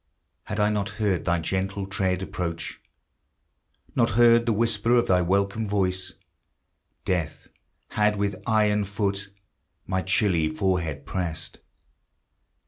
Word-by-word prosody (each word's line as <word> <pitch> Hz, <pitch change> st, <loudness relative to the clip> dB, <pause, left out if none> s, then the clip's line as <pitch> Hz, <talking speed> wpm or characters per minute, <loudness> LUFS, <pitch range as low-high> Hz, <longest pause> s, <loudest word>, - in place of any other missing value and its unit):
Had 105 Hz, -, -4 dB
I 105 Hz, 0 st, +3 dB
not 100 Hz, -2 st, -1 dB
heard 100 Hz, -5 st, 0 dB
thy 85 Hz, -, +2 dB
gentle 95 Hz, +4 st, -2 dB
tread 95 Hz, -1 st, -1 dB
approach, 85 Hz, -3 st, -4 dB, 1.1 s
Not -, -, +3 dB
heard 120 Hz, 0 st, +6 dB
the -, -, +4 dB
whisper 115 Hz, +1 st, +2 dB
of 120 Hz, -, +4 dB
thy 90 Hz, -1 st, +3 dB
welcome 100 Hz, +4 st, 0 dB
voice, 95 Hz, -2 st, 0 dB, 0.9 s
Death 85 Hz, -4 st, -2 dB, 0.4 s
had 105 Hz, 0 st, +2 dB
with 100 Hz, -2 st, -2 dB
iron 105 Hz, -2 st, +3 dB
foot 100 Hz, 0 st, -2 dB, 0.6 s
My 95 Hz, 0 st, -1 dB
chilly 95 Hz, -4 st, +2 dB
forehead 80 Hz, -5 st, -1 dB
pressed. 80 Hz, -2 st, -4 dB
100 Hz, 120 wpm, -25 LUFS, 90-105 Hz, 1.1 s, heard